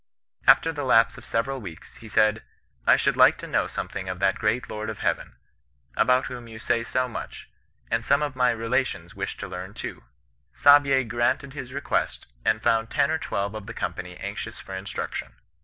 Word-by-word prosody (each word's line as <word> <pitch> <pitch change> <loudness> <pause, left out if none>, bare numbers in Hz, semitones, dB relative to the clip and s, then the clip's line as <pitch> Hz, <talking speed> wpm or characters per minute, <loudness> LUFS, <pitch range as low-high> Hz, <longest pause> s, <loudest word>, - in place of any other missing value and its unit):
After 165 - +6
the 145 -1 -4
lapse 115 -3 +4
of - - -15
several 130 +3 -1
weeks, 85 -7 -10
he 110 - -12
said, 110 0 +3 0.2
* - - -37
I - - +8
should - - +1
like - - +6
to - - -8
know - - 0
something 95 -1 -5
of 90 - -3
that 95 +1 +1
great 115 +5 0
Lord 110 0 -4
of 110 - -5
Heaven, - - -2 0.6
about 125 0 +3
whom 120 -2 -7
you 110 -1 -9
say 115 +1 0
so 130 +2 0
much; 120 - -8 0.4
and 115 0 +1
some 140 +5 +3
of 145 -3 -3
my 125 -1 +3
relations 115 -6 -1
wish - - -4
to - - -6
learn 90 +2 -7
too.' - - -6 0.5
Saabye 140 -3 +6
grant 120 +3 +1
ed 140 -1 -10
his 135 -3 -7
request, 140 +1 -1 0.2
and 110 0 +1
found 115 -1 +2
ten 140 - +2
or 160 - 0
twelve 100 -6 -2
of 110 -1 -7
the 115 - -7
company 90 -1 -4
anxious 100 +3 -6
for 95 - -9
instruction. 95 +1 -5
115 Hz, 200 wpm, -25 LUFS, 100-130 Hz, 0.6 s, I